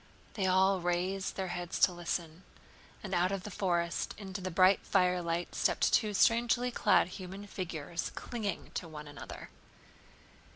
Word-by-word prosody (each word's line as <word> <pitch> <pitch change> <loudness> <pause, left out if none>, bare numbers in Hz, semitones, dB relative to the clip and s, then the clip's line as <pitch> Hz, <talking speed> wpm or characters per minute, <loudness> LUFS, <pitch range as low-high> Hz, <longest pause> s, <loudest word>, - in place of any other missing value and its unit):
They 195 -4 0
all 190 0 +4
raised 180 +2 -1
their 190 -1 -3
heads 175 0 -4
to - - +6
listen, 170 -1 -4 0.6
and 195 -2 -5
out 180 +1 +2
of 195 -2 -3
the 210 - -7
forest 170 -3 -1
into 195 -1 -6
the 185 - -3
bright 185 +2 +5
firelight 175 -2 +1
stepped - - +1
two 210 -3 +3
strangely 240 +3 +3
clad 230 - +4
human 190 +2 -8
figures 170 -4 -4
clinging 220 -5 -4
to 170 - -4
one 150 -2 -9
another. 145 - -9
185 Hz, 150 wpm, -32 LUFS, 175-195 Hz, 0.6 s, to